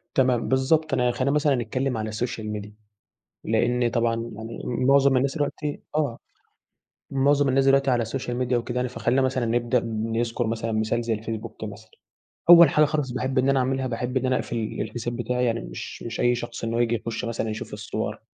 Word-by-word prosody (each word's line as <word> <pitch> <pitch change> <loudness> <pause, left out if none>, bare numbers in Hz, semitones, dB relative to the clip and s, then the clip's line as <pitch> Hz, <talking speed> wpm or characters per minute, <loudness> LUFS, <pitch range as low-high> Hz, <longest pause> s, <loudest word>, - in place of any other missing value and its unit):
تمام 125 -3 +2
بالضبط 155 +4 +2
أنا 125 0 +2
خلينا 130 +3 0
مثلًا 150 -1 +3
نتكلم 125 +1 -2
على 110 0 -3
الsocial 115 0 -3 0.2
media 105 - -10 0.8
لإن 120 +2 +1
طبعًا 115 -1 +1 0.2
يعني 110 +1 -7
معظم 135 +2 +3
الناس 135 +1 +1
دلوقتي 145 0 -2
آه. 145 -6 0 0.9
معظم 140 +1 +3
الناس 135 +1 +3
دلوقتي 135 0 +4
على 120 -2 +1
الsocial 125 +3 -4 0.2
media - - +1
وكده 120 0 -1
يعني، 125 0 0
فخلينا 120 +2 +1
مثلًا 130 -2 0
نبدأ 120 +1 +1
نذكر 115 +1 -1
مثلًا 115 0 -2
مثال 110 +2 0
زي 115 -1 0
الفيسبوك 110 +1 -6
مثلًا. 110 +1 -9 0.6
أول 170 -3 +10
حاجة 150 +1 +4
خالص 145 -3 -1
باحب 130 +2 -2
إن 130 +1 +3
أنا 135 -1 +3
أعملها، 130 +1 0
باحب 125 +1 -2
إن 130 - -1
أنا 130 0 +2
أقفل 120 - -3
ال 110 -2 -3
الحساب 120 +2 -4
بتاعي 125 +1 -1
يعني 115 -1 0
مش - - -8
مش 115 - -5
أي 120 0 +3
شخص 120 -1 -6
إن 115 - -2
هو 115 - 0
ييجي 120 0 +2
يخش 115 +2 -4
مثلًا 115 -1 -2
يشوف 110 0 -6
الصور. 105 0 -4
120 Hz, 195 wpm, -25 LUFS, 115-135 Hz, 0.9 s, أول